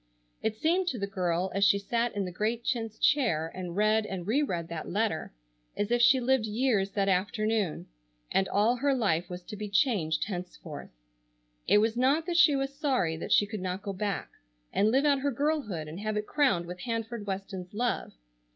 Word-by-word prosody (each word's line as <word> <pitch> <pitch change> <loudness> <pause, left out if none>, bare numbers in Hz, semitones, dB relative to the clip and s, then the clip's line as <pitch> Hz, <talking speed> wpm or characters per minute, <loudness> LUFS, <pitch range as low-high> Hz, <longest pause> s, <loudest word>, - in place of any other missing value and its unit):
It 220 -1 -1
seemed 345 +9 +1
to 260 - -1
the 200 - -1
girl 185 -2 -1
as 195 +1 +1
she 200 0 +5
sat 230 +3 -1
in 200 -1 -1
the 180 - -5
great 220 +6 -1
chintz 225 -4 -2
chair 165 - +2
and 180 -2 -6
read 215 +2 +3
and 185 -3 -5
re 240 +9 +2
read 175 - -2
that 165 -2 -5
letter, 205 -4 -1 0.5
as 205 +2 -1
if 240 0 +3
she 250 +2 +6
lived 250 -2 +2
years 215 -3 +1
that 200 -1 +1
afternoon, 205 0 0 0.5
and 190 - +2
all 220 +5 +2
her 275 +2 +2
life 175 -8 0
was 180 0 -7
to 210 - -8
be 210 0 -5
changed 190 - +1
henceforth. 180 -5 -7 0.8
It - - +5
was 220 +2 +2
not 275 +6 +2
that 350 - -2
she 325 -5 +6
was 270 0 -2
sorry 260 - 0
that - - -6
she 205 - +5
could 205 -1 -6
not 185 +1 -3
go 200 - -3
back, 200 0 -3 0.4
and 210 - +3
live 270 +5 +3
out 285 -2 +4
her 285 +1 0
girlhood 260 - -1
and 160 +4 -7
have 215 0 -2
it 210 - -2
crowned 255 - +2
with 180 +1 -8
Hanford 230 0 -4
Weston's 190 -2 -5
love. 240 +3 -2
210 Hz, 200 wpm, -29 LUFS, 185-245 Hz, 0.8 s, she